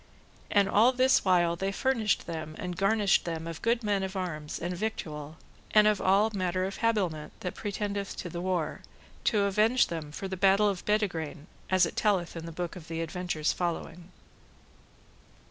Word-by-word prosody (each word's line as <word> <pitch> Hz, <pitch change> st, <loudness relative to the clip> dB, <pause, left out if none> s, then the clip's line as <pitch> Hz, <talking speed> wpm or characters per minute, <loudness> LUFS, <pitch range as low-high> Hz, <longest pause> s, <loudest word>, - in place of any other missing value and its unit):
And 200 Hz, -1 st, +4 dB
all 220 Hz, +5 st, +5 dB
this 255 Hz, +1 st, +4 dB
while 175 Hz, -3 st, +3 dB
they 195 Hz, +3 st, -2 dB
furnished 225 Hz, -1 st, +1 dB
them 160 Hz, -2 st, -5 dB
and 180 Hz, -1 st, -4 dB
garnished 200 Hz, +1 st, +3 dB
them 165 Hz, -1 st, -4 dB
of 165 Hz, -1 st, -6 dB
good 230 Hz, +1 st, +1 dB
men 205 Hz, -2 st, +1 dB
of 190 Hz, +1 st, -4 dB
arms, 155 Hz, -5 st, -4 dB
and 175 Hz, +2 st, -3 dB
victual, 155 Hz, -7 st, -4 dB, 0.4 s
and 210 Hz, 0 st, +8 dB
of 210 Hz, -2 st, +3 dB
all 200 Hz, +4 st, +3 dB
manner 185 Hz, -1 st, -1 dB
of 195 Hz, +1 st, -3 dB
habiliment 185 Hz, -10 st, 0 dB
that 180 Hz, -, -3 dB
pretendeth 200 Hz, -1 st, -3 dB
to -, -, -5 dB
the 170 Hz, 0 st, -5 dB
war, 180 Hz, -4 st, -1 dB, 0.4 s
to 210 Hz, -2 st, +3 dB
avenge 215 Hz, +5 st, +3 dB
them 160 Hz, -3 st, -5 dB
for 195 Hz, +5 st, -5 dB
the 190 Hz, -, -4 dB
battle 195 Hz, +2 st, +4 dB
of 195 Hz, -3 st, -2 dB
Bedegraine, 175 Hz, -7 st, -1 dB, 0.2 s
as 185 Hz, -1 st, +4 dB
it 165 Hz, -, -6 dB
telleth 190 Hz, -6 st, +1 dB
in 165 Hz, 0 st, -6 dB
the -, -, -6 dB
book 175 Hz, +1 st, -4 dB
of 170 Hz, -2 st, -11 dB
adventures 165 Hz, -1 st, -2 dB
following. 175 Hz, 0 st, -4 dB
185 Hz, 175 wpm, -29 LUFS, 165-205 Hz, 0.4 s, and